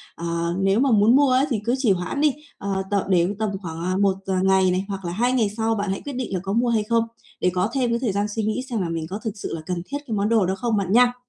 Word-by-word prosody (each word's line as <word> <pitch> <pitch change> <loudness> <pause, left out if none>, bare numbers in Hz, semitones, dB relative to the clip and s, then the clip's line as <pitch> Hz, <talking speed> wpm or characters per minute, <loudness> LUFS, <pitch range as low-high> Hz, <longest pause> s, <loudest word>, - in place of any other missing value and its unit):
ờ, 170 0 -2
nếu 195 +2 +2
mà 270 0 +3
muốn 220 +2 +5
mua 285 0 +5
ấy 260 +2 +4
thì 235 -6 0
cứ 240 +2 +2
trì 255 -6 +2
hoãn 185 +10 -1
đi, 300 -1 +4 0.3
ờ, 195 -1 -2
t - - +2
để 175 -2 +4
tầm 220 -1 0
khoảng, 165 -2 -6
à, 185 +1 0
1 195 -1 +3
d - - -9
ngày 190 -1 +4
này 185 +2 -1
hoặc 195 -2 -5
là 170 - -2
2 240 +7 +1
ngày 230 -5 +2
sau 225 0 +1
bạn 205 -1 -2
hãy 195 - -2
quyết 285 - -6
định 250 -5 -4
là 185 - 0
có 195 0 -2
mua 240 +2 +2
hay 225 -2 +2
không? 230 +1 +2 0.4
Để 180 - +3
có 185 +3 +1
thêm 255 -3 +1
cái 235 0 0
thời 240 -4 0
gian 200 +1 0
suy 220 - -1
nghĩ 215 +4 -1
xem 230 -5 -1
là 175 - -2
mình 165 -1 -3
có 200 +3 -4
thực 220 - -2
sự 205 - -5
là 160 - -6
cần 180 0 -3
thiết 280 - -4
cái 225 - -3
món 205 +1 0
đồ 225 -4 +3
đó 190 +1 0
không 230 +1 -1
bạn 195 -2 -1
nha. 245 +2 +5
205 Hz, 315 wpm, -23 LUFS, 190-235 Hz, 0.4 s, muốn